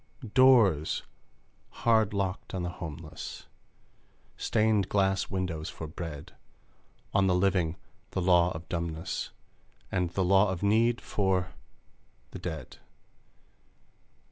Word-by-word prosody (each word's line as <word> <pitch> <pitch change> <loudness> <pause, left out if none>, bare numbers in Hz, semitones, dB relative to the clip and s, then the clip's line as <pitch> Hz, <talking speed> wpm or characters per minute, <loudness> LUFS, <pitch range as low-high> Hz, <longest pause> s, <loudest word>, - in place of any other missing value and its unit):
Doors 115 - +5 0.8
hard 110 -3 +4
locked 95 -2 -3
on 90 - -2
the 90 - -2
homeless, 80 -3 -8 0.9
Stained 110 -3 +1
glass 95 -1 +1
windows 90 -5 -3
for 80 - -7
bread! 80 -2 -7 0.8
On 95 0 +3
the 90 - +3
living, 90 -3 +2 0.3
the - - -3
law 90 -1 +4
of 80 +1 -8
dumbness, 85 0 -3 0.6
And 90 -2 0
the 95 +1 0
law 95 +2 +5
of 95 0 -3
need, 115 +4 +3
for 95 -2 0 0.8
the - - -7
dead! 80 -4 -6
95 Hz, 110 wpm, -29 LUFS, 85-100 Hz, 0.9 s, Doors